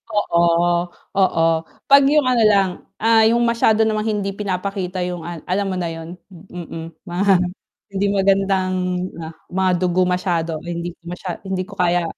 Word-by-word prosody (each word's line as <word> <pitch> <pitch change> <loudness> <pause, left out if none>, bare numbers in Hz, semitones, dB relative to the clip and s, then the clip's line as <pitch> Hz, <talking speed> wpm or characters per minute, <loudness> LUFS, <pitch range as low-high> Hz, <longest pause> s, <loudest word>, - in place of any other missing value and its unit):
Oo, 170 -4 +2 0.8
oo, 165 -3 +3 0.4
'pag 280 0 +7
yung 300 0 +4
ano 250 -3 +2
lang, 195 -2 +4 0.3
ah, 225 0 +4
yung 235 +1 +2
masyado 225 -2 +3
namang 215 0 0
hindi 200 -1 -2
pinapakita 190 -2 -3
yung 180 -1 -3
an 170 -2 -7
alam 195 +2 -1
mo 190 - -2
na 175 -2 -2
yun, 165 +2 -8 0.2
mm, 165 -2 -9
mga 195 +2 +2 0.6
hindi 195 +1 0
magandang 195 -1 +2 0.8
mga 190 0 +1
dugo 180 0 +2
masyado 170 -3 -1
hindi 175 0 -4
ko - - -54
masya 180 0 -6
hindi 190 -1 -3
ko 205 - -16
kaya 175 -2 +1
185 Hz, 155 wpm, -20 LUFS, 175-205 Hz, 0.8 s, pag